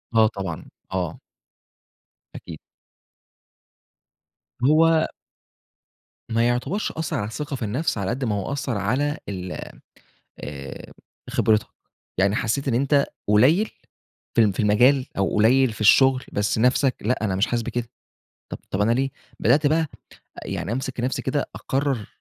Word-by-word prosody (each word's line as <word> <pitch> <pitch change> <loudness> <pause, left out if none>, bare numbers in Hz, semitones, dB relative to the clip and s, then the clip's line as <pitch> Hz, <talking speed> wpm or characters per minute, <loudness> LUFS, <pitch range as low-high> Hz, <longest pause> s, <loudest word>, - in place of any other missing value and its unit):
آه 110 -1 +6
طبعًا. 95 -6 -5 0.3
آه. 90 +2 -3 1.2
أكيد. - - -9 2.0
هو 160 +4 +4 1.2
ما 115 +1 +2
يُعتبرش 135 +12 -1
أثّر 160 -1 -3
على 105 - -2
الثقة 145 +5 -5
في 120 - -4
النفس 125 +6 -1
على 100 -2 -2
قد 130 +2 -2
ما 105 -3 0
هو 100 +6 -3
أثّر 135 -5 -2
على 135 - 0
ال 90 -2 -5 0.9
آآ 70 -1 -8 0.4
خبرتك، 110 -1 +2 0.5
يعني 100 +2 +3
حسّيت 135 +5 -1
إن 120 - +1
أنت 140 +2 +3 0.2
قليّل 145 - +4 0.6
في 115 - +5
الم 105 -3 +3
في - - -3
المجال 125 +6 +4
أو 95 - +1
قليّل 120 +3 +4
في 110 - -11
الشغل 130 +4 +5
بس 105 +2 0
نفْسك 125 +3 +3
لأ، 110 0 0
أنا 95 -3 0
مش 100 - +2
حاسس 120 -1 -1
بكده، 120 0 -3 0.6
طب - - -4
طب 95 - 0
أنا 115 +3 +3
ليه 135 +3 +1 0.3
بدأت 145 +6 +4
بقى 160 +1 +2 0.6
أ - - -7
يعني 105 - -3
أمسك 130 0 -3
نفْسي 125 +2 -1
كده، 140 +2 -1
أكرّر 135 -6 -1
120 Hz, 145 wpm, -23 LUFS, 105-140 Hz, 2.0 s, آه